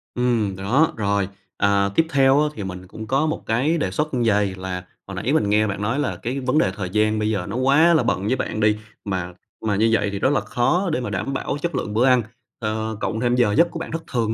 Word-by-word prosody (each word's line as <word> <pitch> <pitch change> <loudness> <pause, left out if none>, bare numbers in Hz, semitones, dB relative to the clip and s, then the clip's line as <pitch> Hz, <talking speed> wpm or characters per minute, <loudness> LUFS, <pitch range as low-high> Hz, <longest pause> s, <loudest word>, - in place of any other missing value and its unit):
Ừm, 120 -5 +1
đó, 120 +12 +2
rồi. 100 -2 0 0.3
À, 100 0 +2
tiếp 165 - +4
theo 135 0 +4
á 150 - +2
thì 105 - -6
mình 95 -1 -7
cũng 110 +3 -9
có 135 +6 +2
một 155 +1 -2
cái 130 +9 +1
đề 95 - -1
xuất 150 +8 -2
như 125 -2 +1
vầy, 100 -3 +2
là 95 -1 -5 0.2
hồi 95 - -7
nãy 115 +10 -1
mình 105 -10 +2
nghe 105 +1 +3
bạn 100 -1 -4
nói 115 +7 0
là 145 - -1
cái 130 +4 -2
vấn 130 +2 0
đề 95 -11 +3
thời 95 -3 -4
gian 110 +2 +1
bây 105 0 0
giờ 100 -5 -1
nó 100 - -4
quá 140 +7 +4
là 160 - +3
bận 95 +2 -1
với 130 - +2
bạn 110 - -3
đi, 105 0 +3 0.3
mà 90 -3 -3 0.3
mà 105 -2 +1
như 110 +3 +3
vậy 110 -3 +2
thì 100 - -4
rất 130 - +2
là 135 - +3
khó 170 +10 0
để 130 - 0
mà 120 - -3
đảm 105 +7 -3
bảo 135 - -2
chất 170 -3 -2
lượng 105 - -3
bữa 115 +4 +3
ăn, 125 -2 +5 0.4
ờ, 110 -1 -3
cộng 110 - -2
thêm 120 +1 +1
giờ 120 -4 +3
giấc 170 +3 +5
của 165 - -5
bạn - - -6
thất 165 0 -4
thường 115 -4 0
110 Hz, 270 wpm, -22 LUFS, 100-135 Hz, 0.4 s, ăn